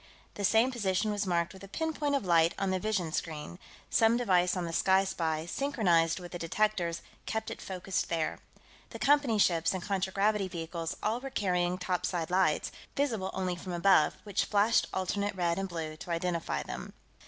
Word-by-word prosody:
The 205 - -5
same 225 +6 +4
position 210 -3 0
was 205 -1 -1
marked 170 +1 0
with 190 0 -13
a - - -8
pin 320 +10 -2
point 290 -2 0
of 275 - -1
light 170 -1 +4
on 195 -1 0
the 185 - 0
vision 195 -5 -1
screen 160 +1 -4 0.3
some 225 +1 +4
device 185 -6 +2
on 180 - -1
the 165 - -5
Sky 190 +3 +4
Spy, 160 -4 -2
synchronized 175 - +1
with 175 -1 -9
the 175 - -5
detectors, 170 -1 0 0.2
kept 220 0 -2
it - - -7
focused 190 0 -3
there. 165 -2 -1 0.5
The - - -8
Company 280 -5 +3
ships 170 -3 +3
and 185 - -4
contragravity 195 +1 +1
vehicles 165 -1 -4
all 220 +3 +1
were 270 +2 -6
carrying 180 -6 0
topside 180 -2 -2
lights, 180 -5 +2 0.2
visible 225 -9 0
only 185 -1 -1
from 180 +1 -7
above, 170 -3 +4
which 205 -2 0
flashed 210 +3 +3
alternate 200 +2 -1
red 175 -1 0
and 195 0 -3
blue 160 -3 -4
to 180 - -10
identify 170 0 -1
them. - - -7
185 Hz, 185 wpm, -30 LUFS, 170-210 Hz, 0.5 s, same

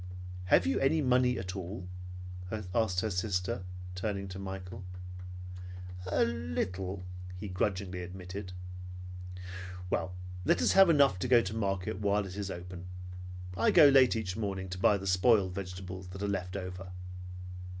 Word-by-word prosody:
"Have 90 -1 +5
you 90 - +2
any 145 +4 +4
money 125 -2 +4
at 95 0 -4
all?" 90 -1 -5 0.9
asked 105 -6 +2
her 110 - 0
sister, 90 -1 0 0.3
turning 100 +1 -2
to 95 +1 -6
Michael. 95 -1 -5 1.2
"A - - +3
little," 90 +4 -2 0.3
he 105 +3 -5
grudgingly 95 0 -1
admitted. 90 +2 -6 1.4
"Well, 90 -1 0 0.3
let - - +4
us - - +4
have 195 -2 +8
enough 140 - +6
to 110 - 0
go 120 -1 +7
to 95 +2 -3
the 110 - -2
market 95 -2 0
while 100 0 +2
it 95 -1 -7
is 100 -1 -3
open. 90 0 -6 0.7
I - - +4
go 155 -5 +9
late 135 -3 +7
each 95 -5 -1
morning, 95 -3 -2
and 90 - -5
buy 100 - +6
the 95 - -6
spoiled 95 0 +4
vegetables 90 -1 -5
that 95 +2 -6
are - - +1
left 95 -1 -1
over." 90 -1 -5
95 Hz, 150 wpm, -32 LUFS, 90-105 Hz, 1.4 s, go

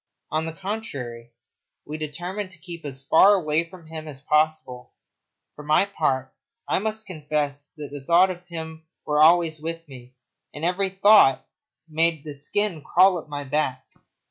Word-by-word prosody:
On 155 +1 0
the 160 - -5
contrary, 145 - -6 0.6
we 155 +1 -6
determined 175 +7 -5
to 180 - -9
keep 170 -1 -9
as 135 -1 -3
far 190 +8 +6
away 165 -2 0
from 180 -3 -14
him 160 0 -8
as 140 -3 -8
possible. 150 -3 0 0.6
For 150 - -11
my 155 +6 +3
part, 135 -9 -2 0.3
I - - +1 0.3
confess 150 -4 -2
that 145 -2 -8
thoughts 180 +3 +5
of 180 0 -18
him 160 -2 -8 0.2
were 150 0 +1
always 160 -1 +4
with 165 +1 -5
me, 130 -2 -13 0.4
and 150 +2 -4
every 185 +2 0
thought 195 -6 +5 0.4
made 160 -1 0
the 150 - -7
skin 165 +5 +1
crawl 180 +2 +4
up 155 - -13
my 145 -1 -5
back. 135 -2 -2
155 Hz, 155 wpm, -24 LUFS, 145-175 Hz, 0.6 s, far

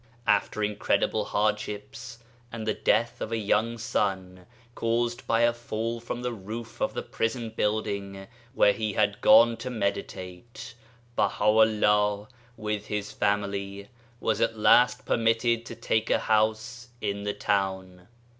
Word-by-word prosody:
After 105 - +1
incredible 105 0 0
hardships, 105 +3 -3 0.3
and 115 -2 -6
the 110 - +1
death 120 +4 0
of 110 - -4
a 115 - 0
young 110 +2 0
son 95 -6 -2 0.3
caused 120 +1 -1
by 115 0 +2
a 120 0 +4
fall 115 0 -4
from 120 +1 -6
the 125 -1 -2
roof 110 +2 -8
of - - -1
the - - -3
prison 115 0 -3
building 100 -3 -2 0.3
where 100 - +5
he 110 -2 -3
had 105 0 0
gone 115 0 +6
to 125 +3 -5
meditate, 100 +1 -5 0.4
Baha' 105 - 0
u' 110 +1 +6
llah, 105 0 +2 0.3
with 105 -1 -3
his 105 -1 -3
family, 100 -1 -2 0.3
was 110 - 0
at 115 -1 +1
last 125 +3 +4
permitted 115 +1 +1
to - - -7
take 110 +1 -1
a - - +4
house 110 +2 0
in 100 -2 -3
the 105 0 -3
town. 95 -3 -2
110 Hz, 145 wpm, -27 LUFS, 100-115 Hz, 0.4 s, gone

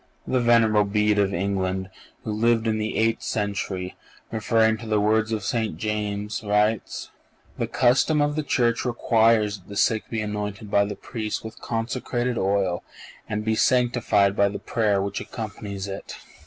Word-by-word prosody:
The 130 - +1
venerable 115 -3 +4
Bede 105 0 +2
of 100 -1 +2
England, 95 0 -1 0.3
who - - -3
lived 115 +1 +2
in 110 -1 +1
the 110 0 -2
eighth 115 +1 +1
century, 100 -3 -3 0.4
referring 110 0 +2
to 115 - -8
the 110 -1 +2
words 110 +2 +2
of 110 -2 -2
St. 110 -6 -1
James, 105 +1 -3
writes: 105 +1 0 0.5
"The - - 0
custom 130 +5 +3
of 145 0 +1
the 155 - 0
Church 120 -5 +1
requires 115 -3 +2
that 90 - -22
the 100 - -6
sick 110 +1 +1
be 115 - -2
anointed 105 -1 -4
by 100 0 +4
the 105 0 -5
Priests 110 -2 -4
with 110 0 -9
consecrated 120 +1 -2
oil 95 -2 0 0.5
and 105 +1 -2
be 110 - +2
sanctified 120 -4 +3
by 100 -1 +3
the 100 - -5
prayer 105 -4 0
which 100 0 -3
accompanies 100 -3 -6
it." 95 0 -7
105 Hz, 165 wpm, -24 LUFS, 100-115 Hz, 0.5 s, venerable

